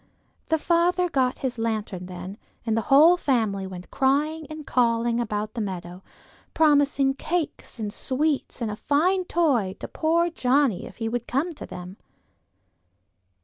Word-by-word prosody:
The 320 Hz, -, +2 dB
father 350 Hz, +2 st, +2 dB
got 260 Hz, -4 st, +1 dB
his 245 Hz, -2 st, -2 dB
lantern 215 Hz, -5 st, -3 dB
then, 185 Hz, +3 st, -8 dB, 0.3 s
and 225 Hz, -2 st, +1 dB
the 225 Hz, -, +1 dB
whole 310 Hz, +6 st, +7 dB
family 220 Hz, -, 0 dB
went 180 Hz, -1 st, -9 dB
crying 295 Hz, +3 st, +1 dB
and 310 Hz, -1 st, -8 dB
calling 235 Hz, -1 st, +1 dB
about 215 Hz, -2 st, -2 dB
the 235 Hz, -, -3 dB
meadow, 180 Hz, -2 st, -5 dB, 0.5 s
promising 285 Hz, -3 st, +3 dB
cakes 320 Hz, -1 st, -3 dB
and 210 Hz, -2 st, -4 dB
sweets 280 Hz, 0 st, -1 dB
and 225 Hz, -2 st, -1 dB
a -, -, -4 dB
fine 360 Hz, -, +1 dB
toy 260 Hz, -, +1 dB
to -, -, -6 dB
poor 335 Hz, +2 st, +1 dB
Johnnie 260 Hz, -, +1 dB
if -, -, -14 dB
he 225 Hz, -, -2 dB
would 240 Hz, +1 st, -3 dB
come 300 Hz, +8 st, -1 dB
to -, -, -9 dB
them. 180 Hz, +2 st, -9 dB
255 Hz, 150 wpm, -25 LUFS, 215-310 Hz, 0.5 s, whole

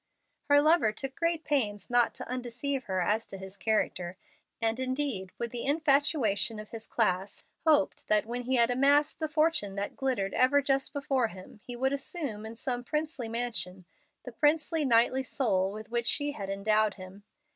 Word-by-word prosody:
Her 285 Hz, 0 st, +5 dB
lover 310 Hz, -8 st, +4 dB
took 265 Hz, +4 st, -5 dB
great 335 Hz, -1 st, 0 dB
pains 210 Hz, -, -1 dB
not 245 Hz, -1 st, +2 dB
to -, -, -8 dB
undeceive 255 Hz, +2 st, -3 dB
her 185 Hz, -1 st, -1 dB
as 215 Hz, +5 st, 0 dB
to 195 Hz, -, -8 dB
his 190 Hz, 0 st, -9 dB
character, 185 Hz, -3 st, -1 dB, 0.4 s
and 225 Hz, +1 st, 0 dB
indeed, 260 Hz, -7 st, -2 dB
with 235 Hz, -1 st, -3 dB
the 240 Hz, -, -3 dB
infatuation 280 Hz, -8 st, +2 dB
of 215 Hz, 0 st, -8 dB
his 225 Hz, -1 st, -8 dB
class, 195 Hz, -3 st, 0 dB, 0.2 s
hoped 300 Hz, -2 st, +3 dB
that, 210 Hz, 0 st, +3 dB
when 240 Hz, +2 st, -4 dB
he 260 Hz, +1 st, +1 dB
had 235 Hz, 0 st, +4 dB
amassed 285 Hz, +4 st, +3 dB
the 315 Hz, -1 st, -2 dB
fortune 305 Hz, -10 st, +1 dB
that 200 Hz, 0 st, -4 dB
glittered 235 Hz, -8 st, -1 dB
ever 260 Hz, +3 st, +4 dB
just 275 Hz, -1 st, 0 dB
before 270 Hz, -4 st, 0 dB
him, 185 Hz, +1 st, -12 dB
he 245 Hz, -1 st, -4 dB
could 265 Hz, +2 st, +1 dB
assume, 275 Hz, -, -4 dB
in 225 Hz, -, -8 dB
some 245 Hz, +1 st, -3 dB
princely 300 Hz, -3 st, -3 dB
mansion, 195 Hz, -6 st, -3 dB, 0.4 s
the 250 Hz, -, -8 dB
princely, 300 Hz, +4 st, +1 dB
knightly 245 Hz, +1 st, +4 dB
soul 200 Hz, -8 st, 0 dB
with 215 Hz, +2 st, -9 dB
which 235 Hz, -1 st, 0 dB
she 290 Hz, -1 st, +1 dB
had 200 Hz, -8 st, -6 dB
endowed 210 Hz, +2 st, +1 dB
him. 190 Hz, +1 st, -11 dB
240 Hz, 180 wpm, -29 LUFS, 210-280 Hz, 0.4 s, Her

